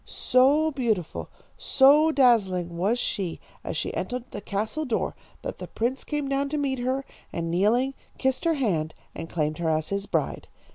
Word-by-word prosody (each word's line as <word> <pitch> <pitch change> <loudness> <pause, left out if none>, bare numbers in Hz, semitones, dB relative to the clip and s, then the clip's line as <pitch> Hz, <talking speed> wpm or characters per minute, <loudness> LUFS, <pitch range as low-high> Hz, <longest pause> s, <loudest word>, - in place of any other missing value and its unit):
"So 285 +5 +3
beautiful, 225 - -2 0.3
so 290 +4 +5
dazzling 195 - +3
was 200 +8 +1
she 190 -7 -2 0.2
as - - -3
she - - -2
entered 250 -1 -3
the - - -6
castle 215 +10 -2
door, 245 -7 -1 0.3
that - - -5
the - - -6
prince 245 +4 -2
came 295 -2 -2
down 275 +1 0
to 300 - -2
meet 270 -3 -1
her, 260 +2 -1 0.3
and 165 -1 -3
kneeling, 230 +9 +2 0.2
kissed 265 +3 0
her 330 -1 +3
hand, 170 - 0 0.2
and 165 - -7
claimed 155 -1 -1
her 165 -2 0
as 155 0 0
his 200 0 -2
bride. - - -1
245 Hz, 175 wpm, -26 LUFS, 180-275 Hz, 0.3 s, so